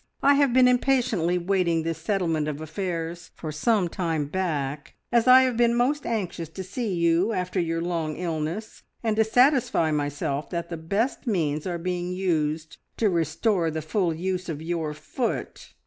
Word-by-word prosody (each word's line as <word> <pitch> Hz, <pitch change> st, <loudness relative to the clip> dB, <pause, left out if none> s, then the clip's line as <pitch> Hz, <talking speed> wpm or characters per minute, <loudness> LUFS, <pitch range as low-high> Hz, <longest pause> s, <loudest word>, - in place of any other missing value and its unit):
I 280 Hz, -, +6 dB
have 280 Hz, -2 st, +3 dB
been 255 Hz, +1 st, +6 dB
impatiently 245 Hz, -9 st, +2 dB
waiting 175 Hz, -2 st, +1 dB
this 165 Hz, -1 st, -3 dB
settlement 165 Hz, -4 st, 0 dB
of 150 Hz, -1 st, -3 dB
affairs 165 Hz, 0 st, -4 dB
for 155 Hz, -, -5 dB
some 185 Hz, +5 st, +2 dB
time 165 Hz, -4 st, -1 dB
back, 145 Hz, -4 st, -3 dB, 0.2 s
as 240 Hz, 0 st, +3 dB
I 255 Hz, +1 st, +9 dB
have 255 Hz, -2 st, +1 dB
been 235 Hz, 0 st, +3 dB
most 270 Hz, +5 st, +1 dB
anxious 180 Hz, -8 st, -3 dB
to 190 Hz, +3 st, -7 dB
see 205 Hz, +4 st, -3 dB
you 170 Hz, +5 st, +2 dB
after 185 Hz, 0 st, -1 dB
your 165 Hz, -1 st, -1 dB
long 165 Hz, -3 st, -2 dB
illness, 170 Hz, +5 st, -4 dB, 0.2 s
and 220 Hz, -2 st, +1 dB
to 220 Hz, -, +5 dB
satisfy 245 Hz, -, +3 dB
myself 145 Hz, -1 st, -2 dB
that 170 Hz, -1 st, -4 dB
the 170 Hz, -, -3 dB
best 200 Hz, -, -2 dB
means 155 Hz, -7 st, 0 dB
are 175 Hz, -1 st, -2 dB
being 180 Hz, +1 st, -3 dB
used 160 Hz, -4 st, -1 dB, 0.2 s
to 215 Hz, -3 st, +2 dB
restore 165 Hz, +2 st, +1 dB
the 160 Hz, 0 st, -4 dB
full 175 Hz, +2 st, 0 dB
use 180 Hz, +2 st, -3 dB
of 150 Hz, -3 st, -3 dB
your 160 Hz, -2 st, -3 dB
foot. 190 Hz, -, -4 dB
175 Hz, 170 wpm, -25 LUFS, 160-215 Hz, 0.2 s, I